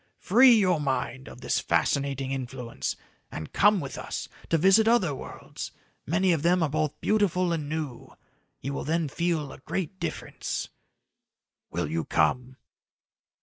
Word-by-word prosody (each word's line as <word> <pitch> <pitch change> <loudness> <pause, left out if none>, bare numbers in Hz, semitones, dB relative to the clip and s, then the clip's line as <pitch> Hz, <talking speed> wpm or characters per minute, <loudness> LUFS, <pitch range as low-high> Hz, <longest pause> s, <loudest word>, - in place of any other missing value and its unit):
Free 245 +5 +6
your 185 -8 +3
mind 135 -1 -2
of - - -11
this - - +1
fascinating 135 -1 0
influence 125 - -4 0.4
and 80 - -7
come 205 0 +5
with 140 -5 -6
us - - -5 0.2
to 165 - +3
visit 195 +6 +5
other 220 -10 +3
worlds, 135 - -8 0.4
many 180 +5 +2
of 165 -4 +1
them 175 +2 +3
are 155 - +1
both 150 0 -1
beautiful 185 -4 +2
and 150 -3 -3
new. 150 -6 -4 0.5
You 140 +2 -3
will - - -3
then 160 +1 0
feel 160 -1 -1
a - - -11
great 185 +5 -4
difference. - - -4 1.0
"Will - - -2
you 80 +2 -1
come?" 125 +11 +1
155 Hz, 145 wpm, -27 LUFS, 135-185 Hz, 1.0 s, Free